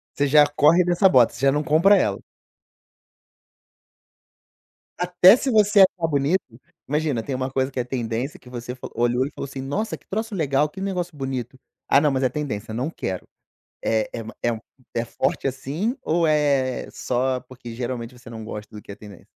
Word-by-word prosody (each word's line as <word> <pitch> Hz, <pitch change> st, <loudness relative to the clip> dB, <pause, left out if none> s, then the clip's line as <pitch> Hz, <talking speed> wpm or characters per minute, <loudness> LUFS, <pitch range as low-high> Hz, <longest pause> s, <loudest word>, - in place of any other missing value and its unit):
Você 145 Hz, 0 st, +1 dB
já 150 Hz, +1 st, +6 dB
corre 155 Hz, +5 st, +4 dB
dessa 175 Hz, +3 st, +4 dB
bota. 125 Hz, -6 st, +5 dB
Você 120 Hz, -, -10 dB
já 135 Hz, -, +5 dB
não 150 Hz, +2 st, 0 dB
compra 170 Hz, +8 st, +5 dB
ela. 100 Hz, -, 0 dB, 2.8 s
Até 180 Hz, +3 st, +6 dB
se 265 Hz, +1 st, -2 dB
você 210 Hz, -1 st, +4 dB
achar 180 Hz, -3 st, +4 dB
bonito? 150 Hz, +5 st, +1 dB, 0.5 s
Imagina, 150 Hz, -5 st, -1 dB
tem 135 Hz, -, -3 dB
uma 130 Hz, +1 st, -2 dB
coisa 130 Hz, 0 st, 0 dB
que 130 Hz, -, -4 dB
é -, -, +1 dB
tendência 120 Hz, +2 st, -3 dB
que 125 Hz, -, -16 dB
você 125 Hz, 0 st, -6 dB
fa 125 Hz, -, -8 dB
olhou 120 Hz, +2 st, +1 dB
e 140 Hz, -, -6 dB
falou -, -, -6 dB
assim: 135 Hz, 0 st, -7 dB
"nossa, 170 Hz, +12 st, -3 dB
que -, -, -31 dB
troço 220 Hz, +1 st, -3 dB
legal, 145 Hz, -2 st, +1 dB
que 190 Hz, +4 st, -9 dB
negócio 180 Hz, -4 st, -3 dB
bonito. 130 Hz, -2 st, -4 dB, 0.3 s
Ah 140 Hz, -, +5 dB
não, 150 Hz, -, +3 dB
mas 130 Hz, 0 st, 0 dB
é 130 Hz, -, +3 dB
tendência, 115 Hz, -7 st, -4 dB
não 125 Hz, +6 st, -2 dB
quero". 95 Hz, -, -5 dB, 0.6 s
Eh, 110 Hz, -1 st, 0 dB
é 115 Hz, -, -5 dB
uma 110 Hz, 0 st, -9 dB
é 120 Hz, -, +2 dB
um 110 Hz, -, -6 dB, 0.4 s
é 115 Hz, 0 st, 0 dB
forte 120 Hz, -, -1 dB
assim 145 Hz, -, -2 dB
ou 165 Hz, +1 st, +1 dB
é 140 Hz, -4 st, +1 dB
só 130 Hz, +1 st, -1 dB
porque 125 Hz, -2 st, -11 dB
geralmente 120 Hz, 0 st, -5 dB
você 120 Hz, -, -13 dB
não 110 Hz, -1 st, -8 dB
gosta 105 Hz, 0 st, -8 dB
do 105 Hz, -, -8 dB
que -, -, -11 dB
é 100 Hz, -, -8 dB
tendência? 105 Hz, -4 st, -14 dB
135 Hz, 195 wpm, -23 LUFS, 120-160 Hz, 2.8 s, já